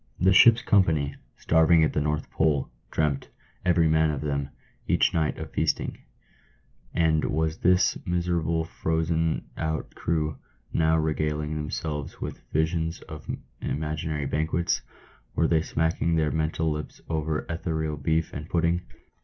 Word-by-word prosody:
The 95 +1 +5
ship's 115 +4 +7
company, 80 -8 +3 0.2
starving 80 0 +4
at 80 - +1
the 75 - +1
North 75 +1 -2
Pole, 75 -4 +1 0.2
dreamt, 75 -3 0 0.3
every 85 -2 +4
man 80 0 +3
of 75 -3 -2
them, 70 -2 -2 0.4
each - - +3
night, 80 -2 0
of - - -7
feasting; - - -1 0.9
and 80 -2 +2
was 80 +1 -1
this 90 +1 +3
miserable 85 -2 0
frozen 80 0 0
out 80 -1 -2
crew 80 -2 -1 0.3
now 80 0 +3
regaling 75 -1 -1
themselves 75 -1 -4
with - - -5
visions 80 +1 0
of 75 -1 -10 0.3
imaginary 75 0 -2
banquets? 80 +4 0 0.3
— - - -31
were 85 - +3
they 80 -1 +3
smacking 80 +1 0
their 80 -2 +2
mental 80 0 0
lips 75 0 -5
over 80 -1 -1
ethereal 80 -2 -2
beef 80 +3 0
and 75 +2 -6
pudding 85 +1 +1
80 Hz, 135 wpm, -26 LUFS, 75-80 Hz, 0.9 s, ship's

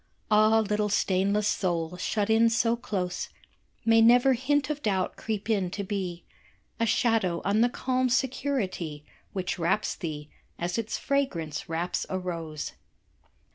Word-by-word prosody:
Ah, 215 +1 +5
little 210 0 0
stainless 200 +1 +1
soul, 175 -2 -1
shut 205 +3 -1
in 225 +1 +5
so 230 +1 +2
close, 195 -7 -3 0.6
May 225 0 +6
never 245 +3 +6
hint 280 +3 +1
of 295 -1 -4
doubt 190 -5 0
creep 215 -2 -4
in 200 -5 +1
to 200 +3 -4
be 185 -3 -4 0.6
A 230 - +2
shadow 215 -7 +2
on 205 +3 +3
the 240 - +4
calm 255 +1 0
security 235 - -1 0.3
Which 185 -1 -2
wraps 180 +6 +1
thee, 150 -5 -6 0.3
as 175 +5 -2
its 225 -1 -2
fragrance 170 - -2
wraps 170 +2 -2
a 190 - -1
rose. 165 -4 -4
205 Hz, 140 wpm, -27 LUFS, 180-230 Hz, 0.6 s, May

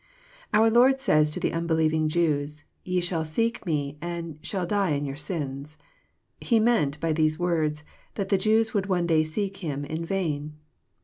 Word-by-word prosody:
Our 225 +1 +4
Lord 255 +3 +5
says 155 - +3
to 150 - -4
the - - -1
unbelieving 160 -2 +1
Jews, 150 -2 0
" - - -45
Ye 180 0 0
shall 175 -2 0
seek 230 +10 -1
Me, 145 -2 -2
and 170 -3 -5
shall 180 +3 -2
die 195 -3 +1
in 145 0 -1
your 135 -1 -4
sins." 145 -2 -4 0.6
He 230 -2 +2
meant, 155 -11 +2
by 165 0 0
these 155 0 +1
words, 160 -3 0 0.3
that 195 -2 -3
the 195 - +4
Jews 220 +2 +2
would 200 -3 0
one 180 -3 +1
day 160 -2 +3
seek 195 +5 -3
Him 145 -6 -4
in 160 +3 -4
vain. 155 -5 -2
165 Hz, 180 wpm, -26 LUFS, 150-195 Hz, 0.6 s, Lord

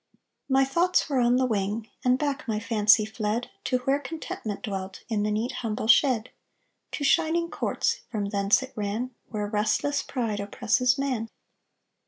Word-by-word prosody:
My 270 0 +4
thoughts 345 +7 +2
were 275 -4 +1
on 240 0 +4
the 260 0 +3
wing, 215 -1 -1 0.2
And 250 0 +4
back 285 0 -2
my 215 -2 0
fancy 215 -1 +4
fled 215 +2 -3
To 255 - +2
where 275 +1 +2
contentment 265 -8 -6
dwelt 195 -4 -5
In 215 -3 0
the 210 - 0
neat 220 +4 -1
humble 215 -3 -2
shed; 235 -1 +4 0.6
To 290 - -3
shining 335 +4 +2
courts - - -1
From 205 -3 -2
thence 200 +5 +2
it 260 - -10
ran, 215 +4 -2 0.2
Where 210 -2 -2
restless 215 +7 0
pride 230 -6 -3
Oppresses 250 +5 +1
man. 255 -5 -2
230 Hz, 160 wpm, -26 LUFS, 210-265 Hz, 0.6 s, My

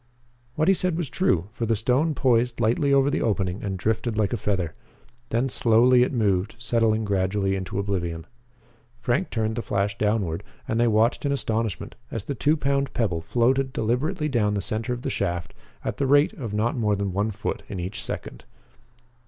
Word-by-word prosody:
What 155 +2 +1
he 195 - +7
said 180 -3 0
was 165 -6 -3
true, 95 - +1
for 115 0 -3
the 115 - +2
stone 130 +9 +1
poised 125 -2 +2
lightly 120 +5 +2
over 140 0 +4
the - - 0
opening 95 -3 0
and 95 -2 -2
drifted 110 +3 -1
like 105 -2 +1
a - - +3
feather. 95 -6 -1 0.6
Then 120 +3 +1
slowly 125 0 +4
it 125 - +2
moved, 100 -4 +1
settling 115 -2 +1
gradually 95 0 0
into 95 0 -4
oblivion. 85 -5 -2 0.7
Frank 125 +9 0
turned 110 -1 -1
the - - 0
flash 100 -1 -1
downward 105 -6 0 0.3
and 115 - 0
they 120 - +4
watched 110 +2 +2
in 140 - 0
astonishment 115 -6 -2 0.2
as 115 - -4
the 140 - -3
two 150 +5 +2
pound 140 -1 0
pebble 90 -9 0
floated 130 +7 +1
deliberately 150 - 0
down 110 -7 +1
the - - 0
center 110 +4 -3
of 120 0 -3
the - - -2
shaft 85 -1 -2 0.3
at - - -2
the 140 - 0
rate 145 +2 +4
of 115 -7 -6
not 110 +3 0
more 105 -4 +1
than 100 -2 -2
one 100 +3 0
foot 110 0 -4
in 95 - -4
each 90 +4 -5
second. - - -6
110 Hz, 190 wpm, -25 LUFS, 100-130 Hz, 0.7 s, he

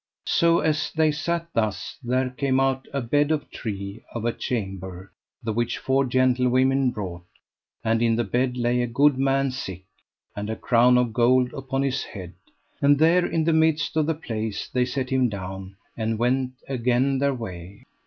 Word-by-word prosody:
So 170 0 +3
as 155 -1 0
they 155 -1 +2
sat 170 +2 -2
thus 110 -3 -1
there 125 +1 0
came 130 0 0
out 135 0 0
a 140 - -2
bed 145 +5 +1
of 155 -2 -1
tree, 100 -1 -6
of 115 -1 -3
a 120 - +1
chamber, 95 -5 -5 0.3
the 110 - -2
which 120 +1 -1
four 135 +1 +1
gentlewomen 130 +1 +2
brought; 95 -7 -5 0.6
and 115 0 +1
in 115 -1 +3
the 120 - +1
bed 125 +4 0
lay 120 0 +1
a 120 - 0
good 135 +3 +3
man 135 0 +2
sick, 95 -9 -6 0.5
and 105 +1 -4
a 110 - -2
crown 125 +2 +4
of 120 -3 +1
gold 125 +1 +3
upon 135 0 -2
his 135 -1 0
head; 90 -4 -9 0.5
and 145 0 +5
there 170 +4 +4
in 165 - 0
the 165 +1 +2
midst 160 0 +2
of 155 -1 +2
the 160 - +1
place 110 -8 -4
they 125 -1 +1
set 130 +1 -3
him 130 -2 +2
down, 95 -1 -7 0.2
and 110 0 -1
went 130 +2 0
again 130 +1 +1
their 140 -1 +1
way. 95 -4 -8
125 Hz, 180 wpm, -24 LUFS, 110-135 Hz, 0.6 s, and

